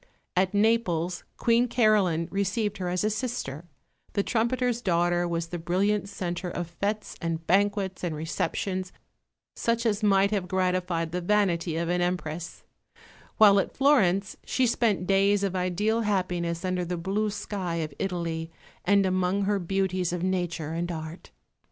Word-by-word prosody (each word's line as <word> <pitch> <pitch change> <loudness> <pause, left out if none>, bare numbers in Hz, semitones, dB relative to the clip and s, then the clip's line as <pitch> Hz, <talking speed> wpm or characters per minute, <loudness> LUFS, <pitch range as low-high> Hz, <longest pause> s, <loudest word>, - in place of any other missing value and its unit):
At 185 +2 +2
Naples 185 -6 +1
Queen 235 +1 +3
Caroline 210 -9 +3
received 200 +1 -1
her 180 -1 -2
as 180 +2 -1
a 215 - +2
sister; 210 - -4 0.5
the 200 - +1
trumpeter's 240 +1 0
daughter 175 -2 +1
was 170 -1 -2
the 175 - -4
brilliant 195 +4 0
centre 175 -2 -4
of 170 -1 -5
fêtes 210 +1 -2
and 165 -1 -3
banquets 195 0 +1
and 170 -3 -1
receptions 180 +4 -2 0.6
such 230 0 0
as 215 -2 +1
might 200 -1 +4
have 195 -4 -1
gratified 180 -3 0
the 180 +1 -2
vanity 175 -4 +1
of 170 0 -1
an 175 +1 +1
Empress: 175 -2 -3 0.7
while 200 -2 +7
at - - -3
Florence 205 -9 +3
she 260 - +1
spent 225 -6 +1
days 195 +1 +3
of 195 -1 -1
ideal 195 +5 0
happiness 180 -4 -1
under 185 -1 0
the 175 0 -3
blue 195 +5 -1
sky 200 -4 -4
of 155 -3 -3
Italy 170 -3 -2 0.3
and 200 +1 +4
among 185 +1 +1
her 200 0 +1
beauties 185 -1 0
of 175 0 -3
Nature 175 -4 -1
and 175 +1 -2
Art. 160 +1 -7
185 Hz, 150 wpm, -27 LUFS, 175-205 Hz, 0.7 s, while